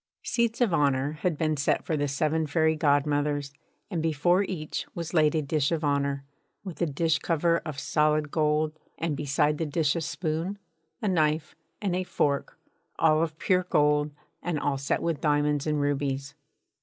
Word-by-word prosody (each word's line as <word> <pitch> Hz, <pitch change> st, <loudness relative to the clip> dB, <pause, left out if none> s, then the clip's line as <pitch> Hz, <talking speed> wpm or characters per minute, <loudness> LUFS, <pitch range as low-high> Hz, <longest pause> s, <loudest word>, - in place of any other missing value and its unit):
Seats 235 Hz, 0 st, 0 dB
of 225 Hz, -8 st, +3 dB
honour 140 Hz, -2 st, +2 dB
had 175 Hz, -4 st, 0 dB
been 155 Hz, 0 st, +1 dB
set 140 Hz, 0 st, 0 dB
for 160 Hz, -, 0 dB
the 145 Hz, -1 st, 0 dB
seven 155 Hz, +3 st, 0 dB
fairy 160 Hz, +1 st, +2 dB
godmothers, 145 Hz, -1 st, +1 dB, 0.4 s
and 170 Hz, -4 st, -1 dB
before 165 Hz, +4 st, +2 dB
each 175 Hz, -6 st, -4 dB
was 170 Hz, -1 st, -5 dB
laid 155 Hz, -2 st, +4 dB
a 155 Hz, -, +1 dB
dish 145 Hz, 0 st, 0 dB
of 165 Hz, -1 st, -1 dB
honour, 140 Hz, -1 st, 0 dB, 0.4 s
with 185 Hz, -4 st, -8 dB
a 170 Hz, -, +3 dB
dish 160 Hz, +2 st, +1 dB
cover 170 Hz, 0 st, +1 dB
of 155 Hz, -4 st, -7 dB
solid 150 Hz, +1 st, +1 dB
gold, 155 Hz, 0 st, +1 dB, 0.2 s
and 160 Hz, -2 st, -1 dB
beside 150 Hz, +1 st, +1 dB
the 165 Hz, -, 0 dB
dish 150 Hz, -1 st, +1 dB
a 165 Hz, -, -1 dB
spoon, 165 Hz, +4 st, -2 dB, 0.5 s
a -, -, +1 dB
knife, 155 Hz, -3 st, +1 dB, 0.3 s
and 190 Hz, -3 st, 0 dB
a 185 Hz, -, 0 dB
fork, 140 Hz, -5 st, -1 dB, 0.4 s
all 155 Hz, -1 st, +4 dB
of 160 Hz, -1 st, -2 dB
pure 185 Hz, 0 st, +1 dB
gold 150 Hz, 0 st, +3 dB, 0.3 s
and 170 Hz, -4 st, -2 dB
all 140 Hz, -2 st, -1 dB
set 140 Hz, -, -1 dB
with 165 Hz, -4 st, -1 dB
diamonds 145 Hz, -1 st, +1 dB
and 150 Hz, -1 st, +1 dB
rubies. 140 Hz, -1 st, -1 dB
155 Hz, 175 wpm, -27 LUFS, 145-165 Hz, 0.5 s, laid